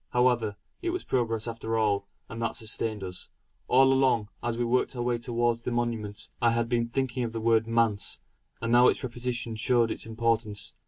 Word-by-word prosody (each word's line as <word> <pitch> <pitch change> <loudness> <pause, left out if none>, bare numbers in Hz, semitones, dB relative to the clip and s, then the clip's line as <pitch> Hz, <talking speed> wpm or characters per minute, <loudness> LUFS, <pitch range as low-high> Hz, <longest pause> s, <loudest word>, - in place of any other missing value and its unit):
However, 120 -4 +2 0.3
it 355 - -1
was 365 +1 -2
progress 115 -3 0
after 115 -1 -2
all; 100 -2 +1 0.2
and 115 0 -7
that 115 - -1
sustained 110 -1 -2
us. 90 -1 -5 0.4
All 135 +1 +5
along, 130 -6 +2
as 120 -1 -2
we 120 - 0
worked 125 +2 +1
our 120 - -3
way 120 -1 0
towards 120 -1 0
the 120 - -3
monument, 115 -4 -2
I 120 - +5
had 115 0 +1
been 115 -1 +1
thinking 130 0 -1
of 115 -1 -3
the 115 - -2
word 115 0 +3
"manse;" 115 -3 +2 0.4
and 115 0 -2
now 120 +1 +7
its - - +2
repetition 120 -2 -3
showed 120 0 +2
its - - -5
importance. 110 -2 0
115 Hz, 195 wpm, -28 LUFS, 110-120 Hz, 0.4 s, now